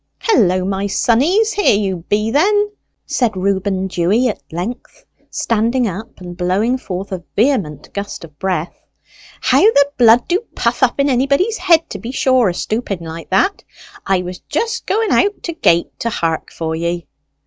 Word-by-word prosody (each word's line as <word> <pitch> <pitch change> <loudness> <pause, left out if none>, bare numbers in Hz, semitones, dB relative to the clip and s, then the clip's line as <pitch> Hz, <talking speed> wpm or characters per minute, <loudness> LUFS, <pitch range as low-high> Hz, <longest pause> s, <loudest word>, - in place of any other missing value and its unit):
"Hullo, 185 - +2
my 195 +1 -1
sonnies, 310 - +2
here 405 - +3
you 195 -3 -1
be, 210 +2 +1
then!" 415 - +2 0.3
said 230 -6 0
Reuben 190 0 0
Dewy 190 +7 +1
at 210 - -5
length, 180 +10 -6 0.2
standing 235 +3 0
up 210 +4 -7
and 175 -1 -8
blowing 195 +8 0
forth 190 -3 -6
a 185 -2 -4
vehement 205 - 0
gust 200 -2 -5
of 155 -3 -14
breath. 180 -3 -2 0.7
"How - - +3
the 285 -10 +4
blood 235 0 +5
do 355 +2 +2 0.2
puff 235 +2 0
up 255 +1 +2
in 280 - +3
anybody's 280 - +1
head, 340 -3 +4
to - - -5
be 230 - -7
sure, 260 -5 +3
a - - -2
stooping 215 -4 -3
like 165 0 -8
that! 195 - +1 0.4
I 190 -2 +1
was 180 0 -7
just 465 0 -2
going 440 +2 +1
out 405 +1 +2
to 335 - -3
gate 170 - +1
to 230 - -1
hark 165 -7 -2
for 160 -1 -3
ye." 170 +1 -2
215 Hz, 170 wpm, -17 LUFS, 185-275 Hz, 0.7 s, blood